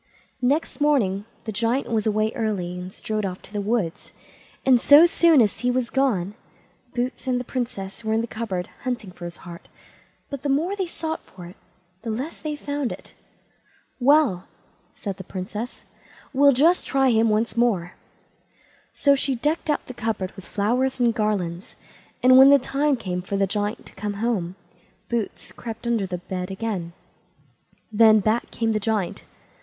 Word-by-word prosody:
Next 285 Hz, +4 st, 0 dB
morning 210 Hz, -10 st, +2 dB, 0.2 s
the 220 Hz, -, -4 dB
Giant 235 Hz, +5 st, 0 dB
was 220 Hz, -1 st, +1 dB
away 215 Hz, +1 st, +1 dB
early, 205 Hz, -6 st, -2 dB
and 180 Hz, +1 st, -7 dB
strode 215 Hz, +2 st, -3 dB
off 185 Hz, -2 st, -3 dB
to -, -, -14 dB
the 205 Hz, -, -1 dB
wood, 200 Hz, -5 st, 0 dB, 0.7 s
and 255 Hz, -3 st, +5 dB
so 290 Hz, +5 st, +8 dB
soon 335 Hz, -4 st, +5 dB
as 210 Hz, -3 st, +1 dB
he 245 Hz, +2 st, 0 dB
was 250 Hz, -1 st, 0 dB
gone 210 Hz, -9 st, +1 dB, 0.6 s
Boots 250 Hz, +1 st, -3 dB
and 250 Hz, -1 st, +1 dB
the -, -, -4 dB
Princess 230 Hz, -6 st, -5 dB
were 220 Hz, -, -2 dB
in 220 Hz, +1 st, +2 dB
the -, -, -2 dB
cupboard 220 Hz, -6 st, -4 dB, 0.2 s
hunting 240 Hz, -7 st, -3 dB
for 175 Hz, -, -10 dB
his 170 Hz, 0 st, -7 dB
heart, 170 Hz, -1 st, -10 dB, 0.6 s
but 280 Hz, -2 st, -5 dB
the 285 Hz, -, -2 dB
more 320 Hz, +8 st, +1 dB
they 380 Hz, -3 st, -2 dB
sought 320 Hz, -1 st, -4 dB
for 180 Hz, -2 st, -13 dB
it, 175 Hz, -, -11 dB, 0.5 s
the 230 Hz, -, -5 dB
less 255 Hz, +9 st, -4 dB
they 300 Hz, -1 st, -3 dB
found 285 Hz, -3 st, -3 dB
it. -, -, -10 dB, 0.9 s
"Well", 265 Hz, -, +3 dB, 0.5 s
said 195 Hz, -3 st, -5 dB
the 190 Hz, -, -7 dB
Princess, 200 Hz, +6 st, -6 dB, 0.5 s
"we'll 280 Hz, +1 st, +6 dB
just 325 Hz, +8 st, +3 dB
try 270 Hz, -2 st, +3 dB
him 225 Hz, 0 st, +3 dB
once 215 Hz, +2 st, 0 dB
more." 210 Hz, -8 st, +1 dB, 1.0 s
So 280 Hz, -, +4 dB
she 275 Hz, -1 st, +1 dB
decked 300 Hz, +6 st, -1 dB
out 295 Hz, -, 0 dB
the 255 Hz, -, -8 dB
cupboard 220 Hz, -6 st, -3 dB
with 190 Hz, -2 st, -11 dB
flowers 250 Hz, +6 st, 0 dB
and 240 Hz, -2 st, +3 dB
garlands, 195 Hz, -5 st, -2 dB, 0.5 s
and 255 Hz, +1 st, +8 dB
when 270 Hz, +1 st, +9 dB
the 280 Hz, -, +8 dB
time 280 Hz, +2 st, +1 dB
came 185 Hz, -7 st, -4 dB
for 195 Hz, +2 st, -3 dB
the 195 Hz, -, +3 dB
Giant 205 Hz, +2 st, -2 dB
to -, -, -13 dB
come 205 Hz, +1 st, -4 dB
home, 200 Hz, -5 st, -1 dB, 0.5 s
Boots 235 Hz, -3 st, -3 dB
crept 230 Hz, 0 st, -8 dB
under 230 Hz, -5 st, 0 dB
the 180 Hz, -1 st, -3 dB
bed 180 Hz, +1 st, -5 dB
again. 190 Hz, -4 st, -4 dB, 1.0 s
Then 220 Hz, 0 st, +6 dB
back 215 Hz, +4 st, 0 dB
came 225 Hz, -1 st, -1 dB
the 215 Hz, -, +1 dB
Giant. 210 Hz, -3 st, -2 dB
225 Hz, 175 wpm, -24 LUFS, 195-260 Hz, 1.0 s, when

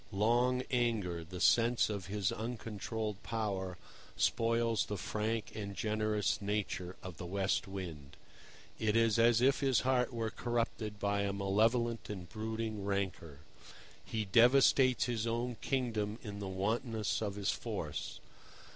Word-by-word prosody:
Long 120 Hz, +5 st, +2 dB
anger, 110 Hz, -9 st, 0 dB
the 90 Hz, +3 st, -8 dB
sense 120 Hz, +4 st, +4 dB
of 100 Hz, -4 st, -4 dB
his 100 Hz, -1 st, 0 dB
uncontrolled 110 Hz, -2 st, -4 dB
power, 95 Hz, -5 st, -3 dB, 0.4 s
spoils 115 Hz, 0 st, +2 dB
the 105 Hz, -, -3 dB
frank 110 Hz, +3 st, -2 dB
and 100 Hz, -2 st, -5 dB
generous 105 Hz, +1 st, 0 dB
nature 100 Hz, -3 st, -2 dB
of 90 Hz, -4 st, -7 dB
the -, -, -6 dB
West 95 Hz, +2 st, 0 dB
Wind. 85 Hz, -8 st, -7 dB, 0.6 s
It 110 Hz, -1 st, +1 dB
is 115 Hz, -1 st, +4 dB
as 115 Hz, 0 st, +5 dB
if 135 Hz, +2 st, +4 dB
his 135 Hz, -3 st, +3 dB
heart 130 Hz, -1 st, +2 dB
were 115 Hz, -2 st, -2 dB
corrupted 115 Hz, -3 st, -2 dB
by 100 Hz, 0 st, 0 dB
a 100 Hz, 0 st, 0 dB
malevolent 110 Hz, +4 st, +1 dB
and 95 Hz, -4 st, -6 dB
brooding 110 Hz, +1 st, -4 dB
rancour. 95 Hz, -7 st, -3 dB, 0.6 s
He 110 Hz, -1 st, -3 dB
devastates 125 Hz, +4 st, +5 dB
his 115 Hz, -2 st, -1 dB
own 120 Hz, +1 st, -1 dB
kingdom 110 Hz, -6 st, -1 dB
in 100 Hz, -3 st, -6 dB
the 100 Hz, -, -4 dB
wantonness 110 Hz, +4 st, -1 dB
of 100 Hz, -2 st, -2 dB
his 100 Hz, -1 st, 0 dB
force. -, -, -4 dB
110 Hz, 140 wpm, -34 LUFS, 100-115 Hz, 0.6 s, as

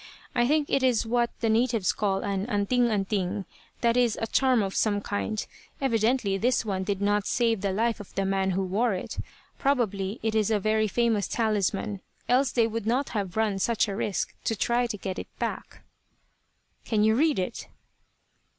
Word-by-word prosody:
I 240 Hz, -1 st, +2 dB
think 300 Hz, +1 st, +2 dB
it 275 Hz, -, +1 dB
is 250 Hz, -4 st, +2 dB
what 235 Hz, +1 st, +1 dB
the 230 Hz, -, +1 dB
natives 225 Hz, -3 st, +2 dB
call 195 Hz, -2 st, 0 dB
an 200 Hz, +1 st, -2 dB
'anting 240 Hz, +2 st, +2 dB
anting;' 195 Hz, -2 st, -1 dB, 0.4 s
that 235 Hz, -1 st, +3 dB
is 245 Hz, -3 st, +2 dB
a -, -, -1 dB
charm 255 Hz, -1 st, +3 dB
of 195 Hz, -1 st, -3 dB
some 205 Hz, -2 st, +2 dB
kind. 205 Hz, +1 st, -3 dB, 0.3 s
Evidently 230 Hz, -5 st, +1 dB
this 245 Hz, +1 st, +1 dB
one 190 Hz, -3 st, -1 dB
did 200 Hz, 0 st, -2 dB
not 205 Hz, 0 st, +1 dB
save 230 Hz, -4 st, +1 dB
the 200 Hz, -1 st, 0 dB
life 225 Hz, +4 st, 0 dB
of 205 Hz, -, -11 dB
the 195 Hz, -, 0 dB
man 190 Hz, 0 st, +1 dB
who 190 Hz, +1 st, 0 dB
wore 205 Hz, +4 st, +1 dB
it. 180 Hz, -, -6 dB, 0.4 s
Probably 215 Hz, -7 st, 0 dB
it 220 Hz, -1 st, 0 dB
is 220 Hz, -2 st, +2 dB
a 215 Hz, -2 st, +2 dB
very 215 Hz, +1 st, +1 dB
famous 225 Hz, -1 st, +1 dB
talisman, 210 Hz, -2 st, -1 dB, 0.3 s
else 250 Hz, 0 st, +3 dB
they 235 Hz, -2 st, +3 dB
would 225 Hz, -1 st, -3 dB
not 255 Hz, +4 st, +1 dB
have 200 Hz, -3 st, -3 dB
run 215 Hz, -3 st, +1 dB
such 230 Hz, +2 st, +1 dB
a 200 Hz, -, -3 dB
risk 200 Hz, -3 st, -2 dB
to 225 Hz, -, +1 dB
try 240 Hz, +3 st, +1 dB
to 220 Hz, -3 st, -4 dB
get 190 Hz, -1 st, -4 dB
it -, -, -6 dB
back." -, -, -5 dB, 1.0 s
"Can 215 Hz, -2 st, +1 dB
you 220 Hz, 0 st, +4 dB
read 300 Hz, +6 st, +2 dB
it?" 185 Hz, +5 st, -3 dB
220 Hz, 185 wpm, -27 LUFS, 200-235 Hz, 1.0 s, you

